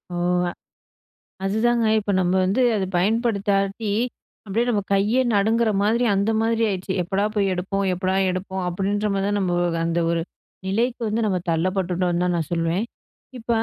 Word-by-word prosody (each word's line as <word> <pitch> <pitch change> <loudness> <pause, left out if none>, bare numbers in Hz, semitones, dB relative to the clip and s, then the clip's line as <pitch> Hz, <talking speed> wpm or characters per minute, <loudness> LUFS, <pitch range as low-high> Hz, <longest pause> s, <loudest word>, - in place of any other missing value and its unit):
ஓ! - - -3 1.3
அதுதாங்க. 225 +4 +1
இப்ப 205 -1 -2
நம்ம 180 0 +1
வந்து 195 +7 +1
அத 195 -2 0
பயன்படுத்தாட்டி, 200 0 0 0.5
அப்டியே 215 +3 0
நம்ம 210 -4 +1
கைய 205 +6 +2
நடுங்குற 220 +3 +2
மாரி, 225 +4 +2
அந்த 200 +3 +1
மாதிரி 225 0 +1
ஆயிடுச்சு. 190 -1 -3
எப்படா 195 +4 0
போய் 200 -2 +2
எடுப்போம்? 195 +2 -2
எப்படா 185 +1 -1 0.2
எடுப்போம்? 190 +1 -4
அப்டின்ற 200 +4 -1
மாரி 195 0 0
தான், 205 0 0
நம்ப 185 -3 0 0.3
அந்த 170 +1 0
ஒரு 170 0 0 0.5
நிலைக்கு 235 +6 0
வந்து 215 +2 -1
நம்ம 195 -3 +1
தள்ளப்பட்டுட்டோம்னு 180 +1 0
தான் 180 -1 +1
நான் 160 -3 -3
சொல்லுவேன். 165 +5 0 0.5
இப்ப 225 - -17
195 Hz, 150 wpm, -23 LUFS, 185-220 Hz, 1.3 s, கைய